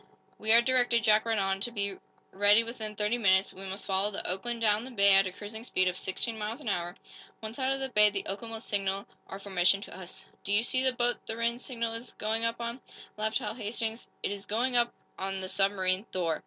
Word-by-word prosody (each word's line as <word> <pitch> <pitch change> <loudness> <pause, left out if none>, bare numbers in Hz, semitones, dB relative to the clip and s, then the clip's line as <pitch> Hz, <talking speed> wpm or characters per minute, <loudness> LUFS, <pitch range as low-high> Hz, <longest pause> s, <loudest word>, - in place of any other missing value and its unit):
"We 215 +1 +1
are 230 +1 +8
directed," 245 -2 +3
Jack 215 0 +4
read 225 -1 0
on, 195 -1 0
"to 220 - +2
be 200 -4 -2 0.4
ready 205 +3 +5
within 220 -2 -4
thirty 210 +4 0
minutes. 190 -3 +3
We 195 +1 -9
must 195 +1 -4
follow 195 +1 +1
the 200 - -6
'Oakland' 230 +6 -2
down 215 0 +2
the 255 - -8
bay 200 -5 +5
at 195 0 +5
a - - -4
cruising 210 +4 -7
speed 185 -6 +1
of 180 - 0
sixteen 220 +5 -2
miles 215 +5 -4
an 265 -8 -5
hour. 175 -2 -2 0.4
Once 220 +3 -7
out 260 0 +1
of 270 - -1
the 265 0 -3
bay, 210 -3 +6
the 200 -1 -3
'Oakland' 215 +4 -5
will 225 -1 -6
signal 195 -2 -1 0.2
our - - -7
formation 195 -1 +2
to - - -9
us." 185 -1 -8 0.2
"Do 200 - -3
you 210 +2 +5
see 255 +2 +1
the 260 - +4
boat 245 0 -1
the 225 - -3
Rhinds 235 +1 -1
signal 230 -3 -3
is 230 +2 -6
going 220 +2 -1
up 230 0 -1
on?" 235 +2 -5 0.3
laughed 215 +1 0
Hal 215 -5 -4
Hastings. 225 0 -2 0.2
"It - - -1
is 200 -1 -6
going 245 +4 0
up 240 0 +3 0.3
on 195 0 -3
the 190 - -5
submarine 195 0 +1
'Thor.' 170 -6 -2
215 Hz, 235 wpm, -29 LUFS, 195-235 Hz, 0.4 s, are